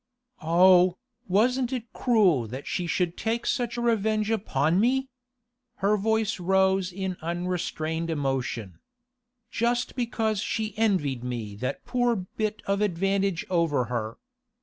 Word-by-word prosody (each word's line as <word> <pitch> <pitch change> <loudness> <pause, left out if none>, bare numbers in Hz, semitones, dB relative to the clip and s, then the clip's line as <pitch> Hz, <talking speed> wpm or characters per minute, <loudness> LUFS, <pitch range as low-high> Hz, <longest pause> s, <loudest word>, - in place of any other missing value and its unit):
'Oh, 180 +2 +5 0.3
wasn't 245 +6 +2
it 245 -3 -5
cruel 190 - +3
that 130 +5 -7
she 180 - -2
should 175 +1 0
take 230 +1 -2
such 240 -2 -1
revenge 220 -2 +1
upon 170 -6 +1
me!' 265 +4 +2 0.7
Her 200 +2 +2
voice 220 0 0
rose 190 +1 +2
in 190 0 -4
unrestrained 170 -1 -2
emotion. 130 - -2 0.7
'Just 240 +1 0
because 225 -4 -1
she 215 +1 -2
envied 180 - +1
me 120 -4 -4
that 130 +5 -4
poor 245 -1 +1
bit 215 +2 -4
of 200 +1 0
advantage 195 -1 0
over 165 -8 +1
her! 110 -1 -3
190 Hz, 125 wpm, -26 LUFS, 165-220 Hz, 0.7 s, Oh